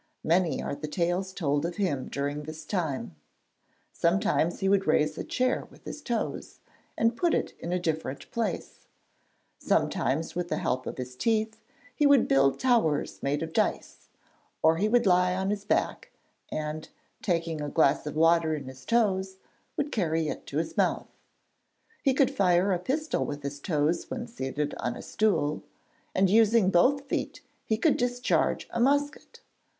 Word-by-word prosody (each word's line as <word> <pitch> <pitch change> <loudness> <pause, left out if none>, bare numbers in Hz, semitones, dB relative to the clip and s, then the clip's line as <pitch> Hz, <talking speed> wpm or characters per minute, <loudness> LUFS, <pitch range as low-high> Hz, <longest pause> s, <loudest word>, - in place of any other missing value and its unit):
Many 170 -2 +1
are - - -3
the 150 - -5
tales 175 +4 -1
told 145 -6 0
of 170 +1 -3
him 160 -11 -1
during 145 +1 -3
this 155 +1 -8
time. 145 - -3 0.8
Sometimes 175 -1 +1
he 195 - 0
would 195 0 +2
raise 155 0 +2
a - - -4
chair 255 +1 0
with - - -19
his 300 - -7
toes, 235 -5 -3 0.4
and 230 +1 +2
put 345 +5 +2
it - - -2
in 170 - -5
a 180 - +1
different 160 -5 -3
place; 220 -7 -4 0.7
sometimes 150 +5 0
with 175 0 -3
the - - -1
help 130 +1 -1
of - - -5
his 125 0 -6
teeth 220 - 0 0.3
he 295 - +4
would 285 -3 +5
build 135 0 +3
towers 230 - +1
made 145 +3 -1
of 160 0 -6
dice, - - -1 0.5
or 160 +1 +5
he 210 +5 +1
would 240 +1 +3
lie 180 -1 +4
on 190 +1 -1
his 205 -1 -3
back - - 0 0.4
and, 155 0 -4 0.3
taking 165 -4 -1
a 145 - -3
glass 150 -1 +2
of 150 - -5
water 165 0 +4
in 145 - -5
his 130 0 -11
toes, 190 -5 +1 0.4
would 295 0 -1
carry 160 -6 0
it - - -6
to 145 - -4
his 165 - -2
mouth. - - +1 0.9
He 270 -2 +2
could 265 -2 +3
fire 185 0 +3
a 180 - 0
pistol 305 - -1
with 145 0 -5
his 140 0 -5
toes 155 +1 0
when 245 -2 -4
seated 150 - -3
on 125 - -2
a - - -8
stool, 160 -9 0 0.5
and 190 +1 +4
using 220 -1 +4
both 265 +11 +4
feet - - -3 0.2
he 220 - 0
could 290 +5 +3
discharge 245 0 0
a 235 - -2
musket. 285 +4 0
175 Hz, 170 wpm, -28 LUFS, 150-220 Hz, 0.9 s, would